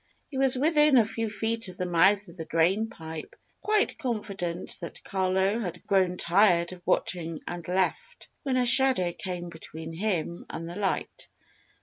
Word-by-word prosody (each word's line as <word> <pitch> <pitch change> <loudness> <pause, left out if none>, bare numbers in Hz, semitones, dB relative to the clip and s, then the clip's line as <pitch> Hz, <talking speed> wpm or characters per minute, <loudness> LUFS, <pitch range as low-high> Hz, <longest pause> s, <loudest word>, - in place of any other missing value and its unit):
He 270 - -5
was 265 -1 +5
within 300 0 +4
a 230 - +5
few 225 +1 -3
feet 225 +1 -1
of 185 0 -7
the 180 - -2
mouth 195 +4 +3
of 170 - -13
the 165 -3 -7
drain 185 +8 +1
pipe, 160 -4 -9 0.3
quite 425 -5 +1
confident 200 - -3
that 170 - -8
Carlo 190 +2 0
had 180 -7 -6
grown 185 -2 +1
tired 175 -1 +3
of 180 - -13
watching 165 -3 -1
and 175 -2 -6
left, 460 - -2
when 265 -3 -1
a 250 - +2
shadow 250 -8 +6
came 180 -5 -6
between 160 0 -9
him 175 -2 -3
and 165 - -6
the 170 - -7
light. 200 -1 -3
190 Hz, 165 wpm, -27 LUFS, 170-230 Hz, 0.3 s, shadow